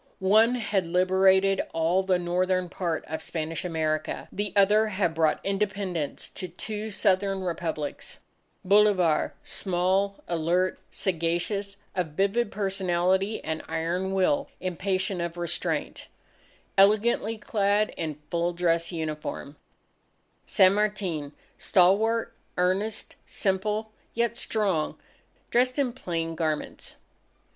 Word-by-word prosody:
One 215 Hz, +5 st, +4 dB
had 205 Hz, -6 st, -1 dB
liberated 190 Hz, +2 st, +4 dB
all 165 Hz, +3 st, +2 dB
the 190 Hz, -1 st, +2 dB
northern 180 Hz, +1 st, 0 dB
part 170 Hz, -3 st, -2 dB
of 160 Hz, +1 st, -5 dB
Spanish 160 Hz, 0 st, -4 dB
America, 155 Hz, -3 st, -2 dB
the 205 Hz, 0 st, -3 dB
other 210 Hz, +2 st, +5 dB
had 190 Hz, -5 st, 0 dB
brought 160 Hz, -1 st, +2 dB
Independence 195 Hz, -5 st, -2 dB
to 185 Hz, -, -6 dB
two 210 Hz, +5 st, -6 dB
southern 195 Hz, -1 st, +1 dB
Republics: 165 Hz, -4 st, -4 dB, 0.5 s
Bolivar 195 Hz, -5 st, +3 dB
small, 190 Hz, +2 st, 0 dB
alert, 175 Hz, +2 st, 0 dB
sagacious, 190 Hz, +3 st, -1 dB, 0.2 s
of 175 Hz, -5 st, -2 dB
vivid 200 Hz, +6 st, +1 dB
personality 190 Hz, 0 st, 0 dB
and 160 Hz, 0 st, -3 dB
iron 170 Hz, +4 st, -1 dB
will 280 Hz, +10 st, +2 dB
impatient 185 Hz, +1 st, -1 dB
of 170 Hz, 0 st, -4 dB
restraint, 175 Hz, 0 st, -3 dB, 0.7 s
elegantly 215 Hz, +2 st, +4 dB
clad 210 Hz, 0 st, +1 dB
in 155 Hz, -3 st, -4 dB
full 170 Hz, +1 st, 0 dB
dress 170 Hz, -1 st, +1 dB
uniform; 155 Hz, -3 st, -5 dB, 0.9 s
San 190 Hz, -2 st, +5 dB
Martin, 195 Hz, -8 st, -1 dB, 0.3 s
stalwart, 215 Hz, +5 st, +3 dB, 0.2 s
earnest, 190 Hz, +4 st, 0 dB
simple, 210 Hz, +3 st, -1 dB, 0.2 s
yet 235 Hz, 0 st, +1 dB
strong, 200 Hz, -10 st, -1 dB, 0.5 s
dressed 250 Hz, +2 st, +2 dB
in 265 Hz, -4 st, +1 dB
plain 165 Hz, -8 st, -3 dB
garments. 155 Hz, -2 st, -3 dB
190 Hz, 105 wpm, -27 LUFS, 170-205 Hz, 0.9 s, other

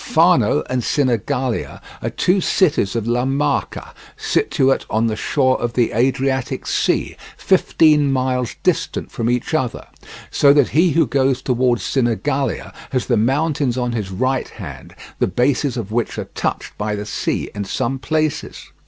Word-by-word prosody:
Fano -, -, +3 dB
and 130 Hz, -1 st, -1 dB
Sinigalia 125 Hz, -2 st, -1 dB, 0.2 s
are -, -, -2 dB
two 185 Hz, +2 st, +1 dB
cities 150 Hz, -, +1 dB
of 115 Hz, -2 st, -1 dB
La 120 Hz, +1 st, +1 dB
Marca 140 Hz, +2 st, -1 dB, 0.2 s
situated 135 Hz, 0 st, +1 dB
on 110 Hz, +1 st, +1 dB
the 110 Hz, -1 st, 0 dB
shore 130 Hz, +3 st, +1 dB
of 120 Hz, -1 st, -2 dB
the 120 Hz, -1 st, +1 dB
Adriatic 130 Hz, +2 st, 0 dB
Sea, -, -, 0 dB, 0.2 s
fifteen 150 Hz, -3 st, +3 dB
miles 130 Hz, -2 st, -1 dB
distant -, -, -1 dB
from 115 Hz, 0 st, -2 dB
each 125 Hz, +5 st, -1 dB
other, 130 Hz, -7 st, -1 dB, 0.5 s
so 140 Hz, -1 st, +5 dB
that 145 Hz, -3 st, +3 dB
he 165 Hz, +1 st, +3 dB
who 165 Hz, -1 st, +4 dB
goes 135 Hz, 0 st, +1 dB
towards 125 Hz, -2 st, +1 dB
Sinigalia 135 Hz, 0 st, -1 dB, 0.2 s
has 130 Hz, -2 st, -1 dB
the 120 Hz, -, +1 dB
mountains 135 Hz, +2 st, +1 dB
on 125 Hz, -1 st, -1 dB
his 110 Hz, -5 st, -3 dB
right 130 Hz, +7 st, -1 dB
hand, -, -, -10 dB, 0.2 s
the -, -, +2 dB
bases 125 Hz, -, 0 dB
of 105 Hz, -3 st, -5 dB
which 115 Hz, 0 st, -1 dB
are -, -, -3 dB
touched -, -, -3 dB
by 105 Hz, 0 st, -1 dB
the 105 Hz, 0 st, -5 dB
sea -, -, -2 dB
in 100 Hz, -, -4 dB
some 130 Hz, +6 st, -2 dB
places. 155 Hz, +2 st, -2 dB
130 Hz, 155 wpm, -19 LUFS, 120-140 Hz, 0.5 s, so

